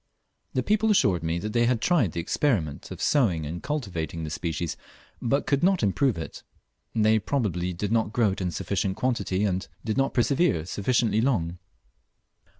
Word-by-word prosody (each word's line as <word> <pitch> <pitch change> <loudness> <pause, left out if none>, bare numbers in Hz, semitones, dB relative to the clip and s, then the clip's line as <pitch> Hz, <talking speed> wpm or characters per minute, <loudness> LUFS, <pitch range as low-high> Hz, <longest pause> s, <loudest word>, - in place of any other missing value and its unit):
The 130 - +1
people 215 +5 +2
assured 100 - +3
me 80 +1 -1
they 110 +5 +1
had 125 -2 +2
tried 120 - +2
the 85 - -3
experiment 85 - -1
of - - -8
sowing 95 - +2
and 85 +4 -5
cultivating 90 - -3
this 75 -1 -4
species, 80 -1 -3 0.5
but 135 +4 +1
could 140 -1 +1
not 185 -3 +3
improve 110 +2 +2
it. 80 - -7 0.5
They 110 0 +4
probably 100 -7 -1
did 100 +4 -3
not 110 -2 +1
grow 110 -3 +2
it 95 - -5
in 90 - 0
sufficient 95 +3 -2
quantity, 105 -6 0
and 95 -2 -1 0.2
did 110 -2 -1
not 135 0 +1
persevere 120 - +2
sufficiently 110 +3 +1
long. 90 -10 0
105 Hz, 165 wpm, -26 LUFS, 85-130 Hz, 0.5 s, They